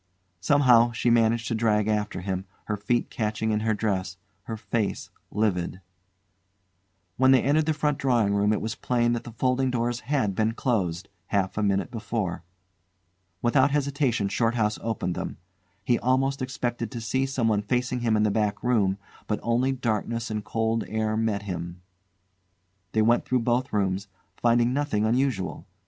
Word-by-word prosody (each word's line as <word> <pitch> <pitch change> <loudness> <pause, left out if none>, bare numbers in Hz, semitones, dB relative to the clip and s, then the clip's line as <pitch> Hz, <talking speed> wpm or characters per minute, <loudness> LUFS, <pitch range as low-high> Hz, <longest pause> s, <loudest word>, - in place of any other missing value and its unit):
Somehow 120 0 +5
she 120 +1 +1
managed 115 0 +3
to - - 0
drag 110 -2 +2
after 105 -3 -1
him, 95 0 -3 0.2
her 105 - -1
feet 120 +4 -1
catching 110 0 -1
in 105 - +1
her 110 0 0
dress, 95 -4 -2 0.3
her 115 - -5
face 105 0 -2 0.2
livid. 90 -4 -1 1.4
When 130 +1 +4
they 130 -2 +5
entered 150 +3 +2
the 160 - +3
front 150 -1 0
drawing 120 -6 +2
room 100 +1 +2
it 105 - 0
was 110 +1 -2
plain 120 -1 +1
that 120 - -3
the 120 - -7
folding 130 +3 +1
doors 120 -1 -1
had 125 -6 0
been 110 +3 +1
closed 95 -8 -1 0.2
half 95 -2 0
a 105 - -1
minute 100 +3 0
before. 110 -6 -3 1.0
Without 130 +3 +4
hesitation 140 -6 0
Shorthouse 115 +1 0
opened 110 -6 -2
them. - - -5 0.5
He 120 0 +2
almost 135 +2 +1
expected 120 -3 -3
to 120 - -6
see 130 +4 0
someone 115 -6 +1
facing 125 +3 -1
him 115 -2 +1
in 105 - +2
the 105 - +2
back 105 -1 -1
room; 105 -6 +2 0.3
but 105 - -1
only 120 +3 +2
darkness 115 -2 -2
and 105 -1 -3
cold 115 +1 0
air 110 0 -1
met 110 -2 0
him. 90 -2 -6 1.1
They 110 - +3
went 120 +2 +3
through 125 -1 0
both 125 +3 0
rooms, 100 -1 0 0.3
finding 120 +1 +2
nothing 135 -7 0
unusual. 120 -4 -1
115 Hz, 160 wpm, -26 LUFS, 105-125 Hz, 1.4 s, Somehow